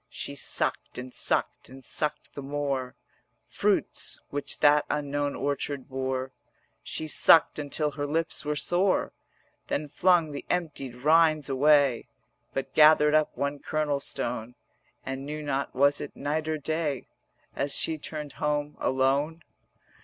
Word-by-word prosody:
She - - -6
sucked - - -2
and 125 0 -7
sucked - - -1
and 130 0 -12
sucked 150 +5 -2
the 140 - -6
more 140 -2 -3 0.5
Fruits - - -1
which 145 0 -3
that 145 0 +6
unknown 145 -1 -1
orchard 140 -1 -3
bore; 130 0 -3 0.5
She 160 - -5
sucked 155 +1 +5
until 150 +1 -1
her 145 0 -4
lips 160 +1 -2
were 150 0 -1
sore; 180 +5 +1 0.5
Then 150 +1 -2
flung 170 +1 +3
the 140 - -6
emptied 150 -8 -2
rinds 155 +2 +3
away 140 -2 +3 0.4
But 135 - -4
gathered 150 -1 +6
up 155 -1 +2
one 140 0 -2
kernel 150 -2 -1
stone, 120 -3 -4 0.5
And 135 0 -4
knew 150 +2 -5
not 140 -2 -2
was 140 +2 +3
it - - -7
night 155 +2 -2
or 155 0 0
day 150 -2 -2 0.5
As 140 +1 0
she 160 -1 +1
turned 150 -1 -6
home 150 0 -2
alone. 140 +5 +1
145 Hz, 140 wpm, -27 LUFS, 135-155 Hz, 0.5 s, that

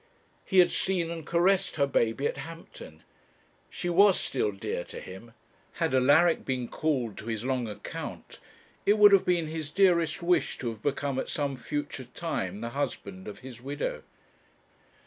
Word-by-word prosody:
He 190 - -1
had 175 -1 +7
seen 175 -3 0
and 165 -2 -7
caressed 180 +3 +2
her 140 - +3
baby 130 -1 0
at - - -1
Hampton. 165 +1 -10 0.7
She 175 - -5
was 190 +2 +5
still 115 -6 -1
dear 95 -3 -4
to - - -8
him. 105 +5 -11 0.4
Had - - -1
Alaric 145 +6 +4
been 130 -2 -2
called 130 -9 -1
to 110 - -9
his 115 0 -3
long 130 -3 0
account, 105 -1 -7 0.4
it 205 +2 +4
would 205 -1 +8
have 195 -2 +5
been 175 -2 +2
his 155 -1 -5
dearest 170 -2 +2
wish 175 +1 +1
to 120 - -3
have 110 -2 -8
become 140 0 -1
at - - -4
some 140 -2 -1
future 145 +1 -4
time 115 - -4
the 115 - -3
husband 115 -8 -4
of 105 - -8
his 125 -3 -10
widow. 140 +3 -3
145 Hz, 165 wpm, -28 LUFS, 120-170 Hz, 0.7 s, would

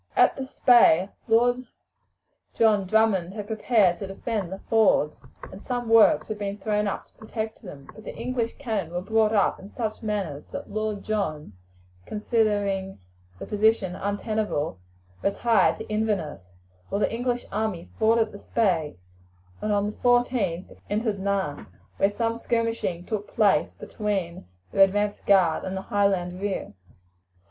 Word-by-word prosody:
At - - +5
the 270 - -4
Spey, 235 - +5 0.2
Lord 245 +2 +3 0.9
John 210 -4 +3
Drummond 200 -3 +2
had 210 -2 -5
prepared 215 -4 +2
to 195 - -5
defend 195 -1 -3
the 190 - -4
fords, 215 -9 +3 0.3
and 190 - -10
some 245 -2 -3
works 225 -1 +5
had 215 -1 -5
been 200 0 -3
thrown 210 0 0
up 200 - -3
to - - -30
protect 220 0 -6
them; 145 - -11
but 215 - -13
the - - -8
English 245 -2 -2
cannon 215 - -3
were 175 - -2
brought 220 +1 +2
up 205 -3 +2
in 195 - -11
such 220 -1 -4
numbers 195 -10 -3
that - - -8
Lord 215 -1 -2
John, 155 - -2 0.5
considering 205 -3 0 0.4
the - - -7
position 210 -3 +1
untenable, 205 - -2 0.4
retired 200 0 +2
to - - -8
Inverness, 200 - -2 0.4
while - - -1
the 210 - 0
English 245 +1 -1
army 210 -6 -2
forded 225 0 +3
the 200 - -10
Spey, 180 -12 0 0.7
and 215 - -1
on 205 0 +2
the - - -18
14th 245 -8 +1
entered 210 -1 -1
Nairn, 190 -7 -2 0.3
where 195 - +3
some 230 +2 -1
skirmishing 230 -7 -1
took 210 -2 -3
place 195 -7 +2
between 190 - -4 0.2
their 195 - +6
advance 205 +1 +1
guard 185 -5 +3
and 190 0 -4
the - - -3
Highland 190 -3 0
rear. 200 - -3
205 Hz, 150 wpm, -25 LUFS, 190-220 Hz, 0.9 s, their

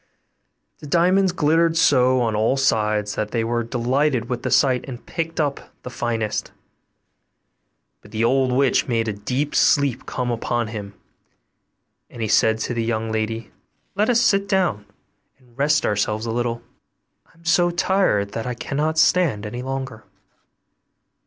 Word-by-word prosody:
The 150 - -10
diamonds 180 +4 +3
glittered 165 0 +2
so 130 -6 +4
on 115 -3 0
all 110 +5 +1
sides 105 -5 +1
that 105 0 -3
they 115 0 -1
were 120 +1 -1
delighted 125 +1 0
with 125 -1 -3
the - - -3
sight 130 -2 +3
and 125 -3 -9
picked 165 -1 -4
up 145 -3 -2
the 125 - -7
finest. 115 -3 -2 1.5
But 105 - -16
the 110 +1 -2
old 130 +2 +2
witch 130 0 +2
made 115 -2 0
a 110 - -1
deep 125 +8 -3
sleep 140 -3 +2
come 125 -1 -2
upon 120 0 -2
him, 105 -3 -7 1.1
and 120 - -12
he 110 - -1
said 110 +1 +3
to 120 - -2
the 115 -1 -1
young 110 -1 -2
lady, 110 0 -3 0.4
'Let 210 +3 +1
us 240 -1 +4
sit 200 -4 +2
down 170 - 0 0.5
and 125 -3 -26
rest 145 +2 +2
ourselves 105 +2 -1
a 115 - -2
little, 120 0 -2 0.6
I - - -27
am 170 - -23
so 175 +1 +3
tired 175 - +1
that 115 +1 -4
I 125 - -3
cannot 150 +5 -2
stand 160 - +2
any 120 +4 -5
longer. 130 -3 -5
125 Hz, 160 wpm, -22 LUFS, 110-150 Hz, 1.5 s, so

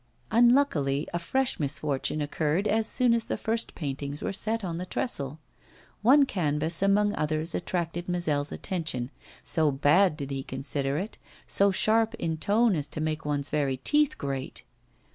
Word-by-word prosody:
Unluckily, 225 - +3
a 175 - 0
fresh 265 +9 -1
misfortune 145 0 -1
occurred 155 +6 0
as 220 +1 +1
soon 250 -2 +3
as 230 -1 0
the - - -2
first 225 +1 -2
paintings 140 -1 -4
were - - -2
set 220 +2 +1
on 170 -2 -3
the 180 - -4
trestle. 145 - -3 0.6
One 275 +6 +6
canvas 160 - -1
among 205 +1 +3
others 155 +2 -1
attracted 175 0 -3
Mazel's 150 -5 0
attention, 155 -9 -3 0.3
so 160 -2 +2
bad 150 +5 +3
did 140 -2 -5
he 135 0 -2
consider 135 +1 -3
it, 195 +6 -5 0.3
so 200 0 +4
sharp 220 +3 +2
in 160 -5 -2
tone 210 +5 +2
as 150 -2 -1
to - - -7
make 155 0 -2
one's 145 -1 -1
very 140 -3 0
teeth 295 - +2
grate. 135 -2 -4
165 Hz, 160 wpm, -27 LUFS, 145-210 Hz, 0.6 s, One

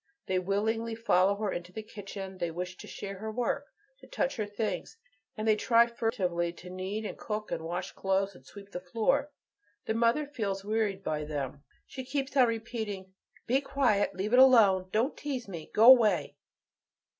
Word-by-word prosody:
They 185 -1 +1
willingly 220 +4 -1
follow 200 -3 +3
her 205 -1 -2
into 175 +1 -5
the 215 +4 -6
kitchen, 195 -3 -8
they 175 -1 -1
wish 180 +2 -5
to - - -10
share 195 -1 -7
her 220 +1 -4
work, 245 +5 -1 0.3
to - - -15
touch 285 - -1
her 215 -2 -2
things, 205 - -3 0.4
and 215 +1 -2
they 215 - +5
try 230 +2 +5
furtively 195 -8 -1
to 180 +1 -11
knead 190 +4 -4
and - - -6
cook 215 0 -4
and - - -2
wash 175 +3 -4
clothes, 195 +1 0
and 130 - -17
sweep 200 +7 -13
the 180 - -4
floor. 230 +10 0 0.6
The - - 0
mother 230 +6 +2
feels 200 -8 -3
wearied 210 -2 0
by 150 -1 -2
them; 145 -2 -4 0.2
she 260 - -7
keeps 270 +1 -3
on 255 -3 +6
repeating, 220 -4 -4 0.3
"Be 260 +4 +2
quiet; 275 -8 +1
leave 200 +5 -2
it 250 - +7
alone. 205 -8 +6
Don't 235 +7 +1
tease 265 -6 -4
me. 170 -5 -8
Go 225 +4 +9
away." 220 -8 +4
210 Hz, 180 wpm, -30 LUFS, 185-230 Hz, 0.6 s, Go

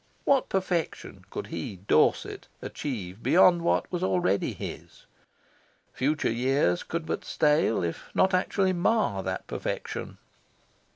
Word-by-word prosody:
What 275 -2 +3
perfection 185 -3 -2
could - - -5
he, 85 +4 -4
Dorset, 95 +2 +1
achieve 105 -8 -5
beyond 175 -1 +5
what 170 - +1
was 175 -1 -2
already 180 - +1
his? - - -8 0.9
Future 145 +1 0
years 120 -6 +1
could 170 -1 -4
but - - -3
stale, 150 - +2
if 85 -1 -4
not 190 0 +3
actually 185 +1 +2
mar, 180 - +1
that 95 0 -4
perfection. - - -5
155 Hz, 120 wpm, -27 LUFS, -, 0.9 s, beyond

